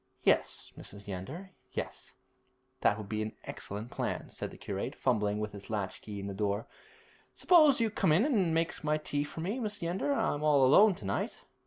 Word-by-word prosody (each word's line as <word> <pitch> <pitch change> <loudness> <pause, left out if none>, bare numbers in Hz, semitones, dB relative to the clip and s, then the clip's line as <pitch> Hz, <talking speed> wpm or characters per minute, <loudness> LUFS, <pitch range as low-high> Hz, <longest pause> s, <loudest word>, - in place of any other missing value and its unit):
'Yes, - - +1
Mrs. 100 0 -9
Yeander, 135 - -6 0.2
yes; - - -5 0.6
that 105 - +3
would 105 -2 -7
be 110 +1 -2
an 110 0 -3
excellent 105 +4 -6
plan,' - - -3
said - - -4
the - - -12
curate, - - -4
fumbling 105 -1 +1
with 105 0 -3
his 100 -1 -10
latch 100 -4 -3
key 105 -2 -7
in 100 - -5
the 100 - -4
door. 100 +1 -1 0.7
'Suppose 305 -7 +6
you 225 -2 +2
come 165 - +2
in 180 - +5
and 205 - +2
make 165 +1 0
my 150 0 +2
tea 145 -1 -2
for 150 +2 -7
me, 200 +9 -2
Mrs. 210 -4 -3
Yeander. 175 +11 0
I'm 145 - +1
all 145 -3 +5
alone 195 +9 +7
to 105 - -10
night.' 100 +1 -1
145 Hz, 195 wpm, -31 LUFS, -, 0.7 s, alone